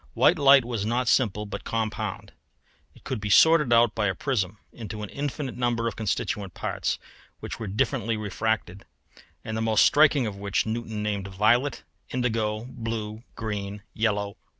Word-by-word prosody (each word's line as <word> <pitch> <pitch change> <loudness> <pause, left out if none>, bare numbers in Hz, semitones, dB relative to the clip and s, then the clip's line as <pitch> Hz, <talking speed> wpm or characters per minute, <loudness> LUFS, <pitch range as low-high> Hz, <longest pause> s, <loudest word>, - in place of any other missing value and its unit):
White 170 - +4
light 140 -3 +7
was 115 -4 -2
not 120 +3 0
simple 105 -5 +2
but 105 - -6
compound. 110 -2 -3 0.6
It - - -19
could 130 -6 -4
be 105 - -3
sorted 150 +3 +6
out 115 -1 +5
by 105 -2 0
a 95 - -1
prism 105 -8 -1 0.2
into 110 -2 -7
an 105 - -6
infinite 140 -2 -4
number 120 -1 0
of 115 - -3
constituent 100 -3 -2
parts - - -2 0.4
which - - -7
were 110 - -4
differently 110 +2 0
refracted, 105 -2 -2 0.6
and 110 - -4
the 110 - -1
most 110 -1 +4
striking 145 -3 +5
of 105 -3 -4
which 100 0 0
Newton 110 -1 -3
named 100 -2 -2
violet, 110 +8 +2 0.3
indigo, 110 -3 -1
blue, 115 -3 -5
green, 105 -2 -4
yellow, 105 -2 +1
orange, 100 - -9
and - - -45
red. - - -41
110 Hz, 175 wpm, -26 LUFS, 105-120 Hz, 0.6 s, light